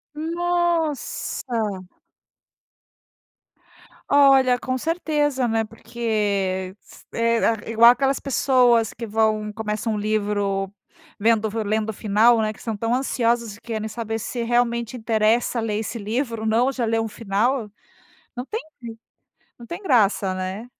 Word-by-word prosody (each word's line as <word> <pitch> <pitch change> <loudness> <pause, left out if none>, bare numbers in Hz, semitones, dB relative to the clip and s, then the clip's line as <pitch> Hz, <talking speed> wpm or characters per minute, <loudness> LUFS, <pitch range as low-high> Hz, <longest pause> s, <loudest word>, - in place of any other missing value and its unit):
Nossa. 320 - -1 2.4
Olha, 270 -3 +5
com 255 0 -2
certeza, 295 -4 0
né, 225 -1 +1
porque 205 -5 -2
s - - -18
eh, 230 -1 +1
igual 230 +1 +8
aquelas 270 +2 0
pessoas 250 -4 +3
que 230 - -7
vão 215 0 0
começam 220 0 -2
um - - -2
livro 205 -2 -1 0.5
vendo 220 0 +2
lendo 215 +1 -1
o - - -2
final, 220 +3 +3
né, 215 0 0
que 215 - -15
estão 225 -2 -4
tão 230 +3 -1
ansiosas 235 -4 0
e 205 - -19
querem 220 -2 -4
saber 225 0 -4
se 235 +2 -4
realmente 235 0 0
interessa 225 +1 +1
ler 215 -2 -1
esse 225 +2 -4
livro 230 +2 -3
ou 220 - -2
não, 235 +4 +3
já 255 -2 -3
leu 225 0 +1
um - - -3
final, 220 +2 -1 0.6
não 245 +1 -5
tem 445 +8 -4 1.0
não 235 - -11
tem 345 - -7
graça, 210 - +2
né. 185 +4 -5
230 Hz, 135 wpm, -23 LUFS, 215-250 Hz, 2.4 s, igual